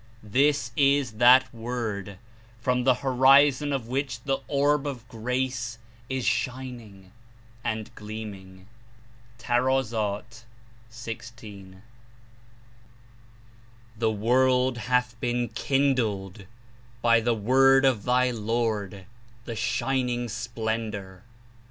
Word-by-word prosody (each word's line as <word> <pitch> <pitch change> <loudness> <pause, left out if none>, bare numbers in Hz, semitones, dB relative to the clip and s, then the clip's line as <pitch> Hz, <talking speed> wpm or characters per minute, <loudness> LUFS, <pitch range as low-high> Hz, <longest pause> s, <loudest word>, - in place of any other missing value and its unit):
This 135 +3 +1
Is 140 -3 +3
that 125 +2 +6
Word, 110 -5 -4 0.4
from 125 +1 0
the 130 -1 +5
horizon 135 +2 +5
of 135 -5 -2
which 130 -1 -3
the 135 -1 -1
Orb 145 0 +1
of 125 -5 -6
Grace 125 0 -3 0.3
Is 130 -2 -2
shining 120 -6 -4 0.5
and 110 +1 -3
gleaming!" 100 -4 -9 0.7
(Tar. 120 -4 0 0.7
16.) 115 -3 -9
11 95 +1 -17 2.1
"The 110 0 0
world 125 +3 +2
hath 125 0 0
been 120 -1 -1
kindled 110 -7 -1 0.6
by 115 -1 +5
the 115 +1 +1
Word 135 +5 +4
of 125 -7 +2
thy 125 +1 +2
Lord, 110 -4 -2 0.4
the 115 - -5
Shining 125 0 -1
Splendor. 110 -4 -4
120 Hz, 95 wpm, -26 LUFS, 110-130 Hz, 2.1 s, that